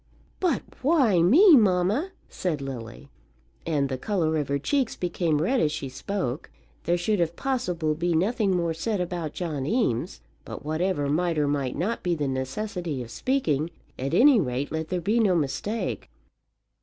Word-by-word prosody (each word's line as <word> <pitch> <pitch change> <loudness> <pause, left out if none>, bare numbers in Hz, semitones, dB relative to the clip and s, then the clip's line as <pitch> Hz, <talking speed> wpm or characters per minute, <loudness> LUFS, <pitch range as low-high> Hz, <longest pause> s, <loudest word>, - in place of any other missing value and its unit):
"But 365 -3 +1 0.2
why 260 - +3
me, 310 - +7
mamma?" 210 - +2 0.2
said 170 -6 -3
Lily, 135 0 -8 0.6
and 145 -4 +1
the 130 -1 -4
colour 170 -6 0
of 145 -3 -1
her 140 - 0
cheeks 260 - 0
became 170 -3 0
red 255 +9 +2
as 150 - +2
she 135 - -4
spoke. 145 -1 -4 0.4
There 175 +1 +2
should 200 +4 0
if 170 -1 0
possible 180 -13 -1
be 170 +2 0
nothing 195 +1 +1
more 170 -1 0
said 200 +6 -2
about 175 -3 -3
John 150 -6 -3
Eames; 120 - 0 0.2
but - - -9
whatever 155 -1 0
might 165 +3 0
or 150 -1 +2
might 140 -3 -1
not 200 +9 -2
be 175 -1 0
the 145 -3 -2
necessity 145 +2 -3
of 115 - -11
speaking, 160 - 0 0.3
at 135 +5 -1
any 260 +2 +6
rate, 130 -3 -2
let 160 0 -3
there 180 0 -2
be 215 +7 +1
no 200 -5 +3
mistake. 170 +9 -2
170 Hz, 170 wpm, -26 LUFS, 145-210 Hz, 0.6 s, me